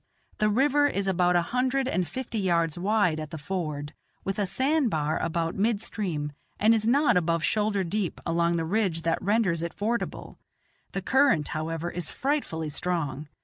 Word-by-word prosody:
The 215 - +3
river 290 +6 +3
is 200 -8 -1
about 180 -1 +2
a 175 - +4
hundred 255 +5 0
and 180 -9 0
fifty 235 - -4
yards 170 -4 +1
wide 185 -3 +1
at 155 -1 -5
the 160 - -6
ford, 150 -3 -4 0.3
with 195 +1 -3
a 200 - +1
sand 275 - +1
bar 155 -3 0
about 165 0 -1
mid 215 +1 +1
stream, 165 -9 -2 0.3
and 220 +2 +5
is 220 -1 +1
not 280 -2 +4
above 165 -2 +1
shoulder 210 +2 +1
deep 185 +1 -2
along 170 0 +1
the 165 -1 -1
ridge 180 -3 0
that 165 0 0
renders 200 -4 +1
it 170 0 -4
fordable; 230 +3 -3 0.5
the 195 - -3
current, 265 - +3
however, 165 +2 -3
is 175 -2 -3
frightfully 260 - -2
strong. 155 -4 -2
180 Hz, 175 wpm, -27 LUFS, 165-220 Hz, 0.5 s, and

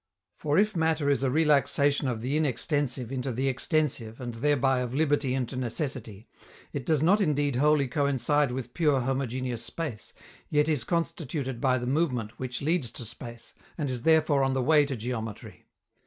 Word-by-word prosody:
For 150 0 0
if 210 +1 +3
matter 160 -3 +1
is 140 - +1
a 135 - +1
relaxation 145 -1 +2
of 120 -3 -2
the 135 +4 -1
inextensive 140 -3 -1
into 130 0 -2
the 130 +3 -1
extensive 135 -4 -1
and, 120 -2 -5
thereby, 135 +1 +2
of 125 0 -3
liberty 145 -3 +1
into 130 0 -3
necessity, 120 -4 -4 0.5
it 140 -4 -4
does 155 -2 +2
not 200 +6 +4
indeed 145 -6 +1
wholly 150 0 +3
coincide 140 +1 +1
with 125 -1 -5
pure 150 -5 +2
homogeneous 130 -2 -2
space, 145 -10 -5 0.4
yet 150 0 +2
is 150 -6 +1
constituted 145 -6 -2
by 130 -1 +3
the 125 - -4
movement 125 -6 -1
which 125 0 -4
leads 155 -5 +1
to 120 - -5
space, 120 +1 -9 0.2
and 145 -5 -2
is 125 -2 -2
therefore 155 -1 +3
on 135 0 +1
the 130 - +1
way 150 +2 +5
to 135 - -3
geometry. 115 -2 -6
135 Hz, 170 wpm, -28 LUFS, 125-150 Hz, 0.5 s, way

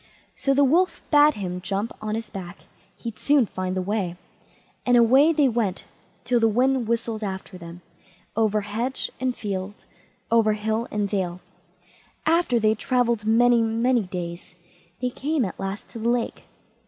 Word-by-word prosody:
So 275 0 +1
the 285 - +5
Wolf 345 +7 +3
bade 295 0 +6
him 180 -3 -4
jump 200 +4 -2
on 215 0 -2
his 225 -1 -5
back, 180 -2 -8 0.4
he'd 230 -2 -7
soon 285 -4 +4
find 185 -1 -4
the 185 - -1
way; 190 -3 -2 0.7
and 245 -1 +4
away 260 +7 +6
they 300 -3 +3
went, 225 -6 -1 0.4
till 245 -1 +2
the 225 - +4
wind 250 +2 +2
whistled 230 -1 -2
after 190 -2 -5
them, 170 0 -10 0.5
over 215 -1 +2
hedge 225 +6 -3
and 255 -1 -1
field, 200 0 -5 0.5
over 225 -2 +4
hill 220 +2 -2
and 205 -1 -1
dale. 185 -3 -2 0.9
After 320 -7 +3
they 215 -1 +3
had 215 0 0
travelled 235 -4 +1
many, 240 +1 +5
many 230 +2 +2
days, 180 -1 -6 0.4
they 250 0 -1
came 290 0 -1
at 185 - -7
last 195 +1 -5
to 230 - -8
the 230 +2 0
lake. 240 -1 -1
225 Hz, 165 wpm, -24 LUFS, 195-245 Hz, 0.9 s, bade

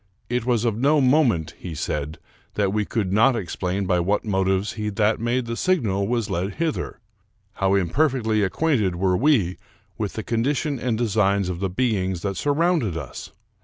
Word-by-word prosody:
It 125 0 -1
was 120 -2 +2
of 115 -3 +1
no 145 +4 +4
moment, 125 - +2
he 85 -3 -6
said, 75 +2 -3 0.4
that 100 -2 +1
we 105 -1 0
could 100 -5 -2
not 115 +5 +4
explain 95 -1 -2
by 90 -1 +2
what 100 +6 0
motives 95 0 0
he 105 -1 -3
that 105 +1 +1
made 120 +2 0
the 115 0 -3
signal 110 - +1
was 115 -2 0
led 95 0 -2
hither. 165 -2 -2 0.5
How 95 0 +1
imperfectly 110 - +1
acquainted 105 - +1
were 90 +1 +1
we 110 - +2 0.4
with 105 -3 -2
the 110 - -4
condition 140 +6 -1
and 120 -3 -1
designs 100 -4 +1
of 90 -2 -4
the 95 0 -1
beings 95 -4 -1
that 100 -1 -2
surrounded 145 - +1
us! 80 - -7
105 Hz, 170 wpm, -23 LUFS, 95-125 Hz, 0.5 s, no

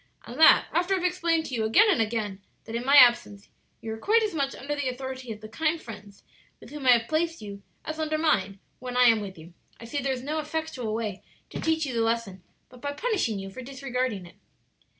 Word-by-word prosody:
"And 245 +5 -9
that 320 - +7
after 355 +4 +2
I - - 0
have 360 - -2
explained 335 -3 +1
to 270 - -7
you 225 -3 0
again 225 - +5
and 335 - +2
again 210 -3 -2 0.2
that 225 - -8
in 235 - -2
my 275 +3 +4
absence 240 -6 +5 0.3
you 220 - -5
are 220 - -8
quite 445 - +3
as 425 - -2
much 280 -3 -1
under 290 +2 -4
the 285 -3 -1
authority 260 -1 -6
of 215 -1 -8
the 215 - -8
kind 315 +8 -1
friends 210 -6 -12 0.4
with - - -14
whom 290 -3 -5
I 250 - +9
have 230 -1 +1
placed 330 +1 -1
you 200 -1 -9 0.2
as 315 0 -5
under 310 0 -1
mine 200 -11 +1 0.2
when 250 0 -5
I 250 - +6
am 230 -3 +5
with 195 -3 -8
you. 165 +2 -13 0.3
I 230 - -10
see 285 +5 -3
there 270 +1 -1
is 255 -1 -4
no 305 +3 -2
effectual 305 -8 -3
way 215 -4 -4 0.3
to - - -5
teach 320 -1 0
you 265 - -4
the 230 - 0
lesson 225 -5 -1 0.3
but 250 -1 -17
by 285 0 -3
punishing 360 - -1
you 195 0 -7
for 255 - -8
disregarding 255 -6 -3
it." 175 - -16
255 Hz, 240 wpm, -26 LUFS, 220-310 Hz, 0.4 s, I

